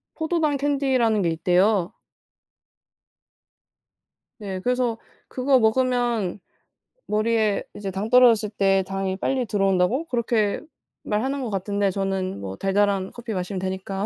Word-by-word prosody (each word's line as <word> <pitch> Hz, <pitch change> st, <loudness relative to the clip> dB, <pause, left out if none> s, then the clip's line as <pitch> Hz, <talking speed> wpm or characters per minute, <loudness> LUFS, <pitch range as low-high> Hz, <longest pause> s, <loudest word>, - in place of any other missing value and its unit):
포도당 315 Hz, -3 st, 0 dB
캔디라는 265 Hz, -6 st, +1 dB
게 170 Hz, -, +1 dB
있대요. 180 Hz, +3 st, +2 dB, 2.5 s
네. 195 Hz, -4 st, -5 dB
그래서 245 Hz, 0 st, 0 dB, 0.3 s
그거 260 Hz, +1 st, +2 dB
먹으면 240 Hz, -4 st, +1 dB, 0.7 s
머리에 215 Hz, -1 st, +1 dB
이제 200 Hz, -1 st, -5 dB
당 195 Hz, +4 st, -4 dB
떨어졌을 235 Hz, -4 st, +5 dB
때 195 Hz, -2 st, +2 dB
당이 195 Hz, -1 st, -2 dB
빨리 260 Hz, +5 st, -1 dB
들어온다고 195 Hz, -, +1 dB
그렇게 235 Hz, -6 st, 0 dB, 0.4 s
말하는 260 Hz, +6 st, -1 dB
것 245 Hz, -, -3 dB
같던데 200 Hz, +1 st, -1 dB
저는 190 Hz, -, -2 dB
뭐 95 Hz, -1 st, -6 dB
달달한 195 Hz, -, 0 dB
커피 235 Hz, -2 st, -7 dB
마시면 185 Hz, +1 st, -3 dB
되니까. 190 Hz, +1 st, -3 dB
210 Hz, 275 characters per minute, -23 LUFS, 195-245 Hz, 2.5 s, 떨어졌을